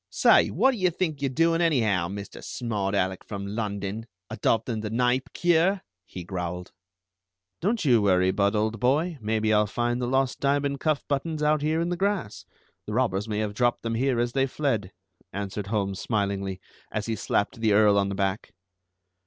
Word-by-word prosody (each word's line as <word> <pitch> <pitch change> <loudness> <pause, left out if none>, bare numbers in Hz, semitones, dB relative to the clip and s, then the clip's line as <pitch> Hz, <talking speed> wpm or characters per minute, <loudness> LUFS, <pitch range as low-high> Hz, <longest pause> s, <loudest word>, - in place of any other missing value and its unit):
"Say, - - +5
what 265 - +3
do 250 - -4
you 185 -2 +2
think 160 -4 -2
you're 140 - +1
doing, 165 +5 +2
anyhow, 110 - +2
Mr. 100 +2 -8
Smart 105 -5 -2
Alec 95 -1 -1
from 100 -2 -6
London, 100 +1 -4 0.2
adopting 115 +1 0
the 105 0 -4
Kneipp 125 +3 0
cure?" 175 +3 +2 0.2
he 90 - -8
growled. 90 0 -5 0.9
"Don't 210 +1 0
you 120 -5 +5
worry, 95 -2 +3
Budd 100 +2 +1
old 110 +1 0
boy, 150 - +1
maybe 110 0 +1
I'll 105 0 +3
find 120 +3 -1
the 120 - -1
lost 135 +1 0
diamond 140 0 0
cuff 155 -1 0
buttons 150 +2 -2
out 150 0 +2
here 155 +2 +1
in 170 +1 0
the 175 - -2
grass. 195 - -2 0.4
The 105 - -4
robbers 105 -4 0
may 105 - -1
have 105 -1 -1
dropped 120 +2 +1
them 115 0 -2
here 125 +1 +1
as 120 0 0
they 135 0 +2
fled," 120 -9 -1 0.4
answered 100 0 -4
Holmes 100 -2 -1
smilingly, 100 -3 -2 0.3
as 105 -1 -2
he 115 - -2
slapped 100 +2 -1
the 110 -2 +3
Earl 105 0 +5
on 100 0 0
the 100 - -3
back. 95 +1 -2
115 Hz, 185 wpm, -26 LUFS, 100-140 Hz, 0.9 s, Say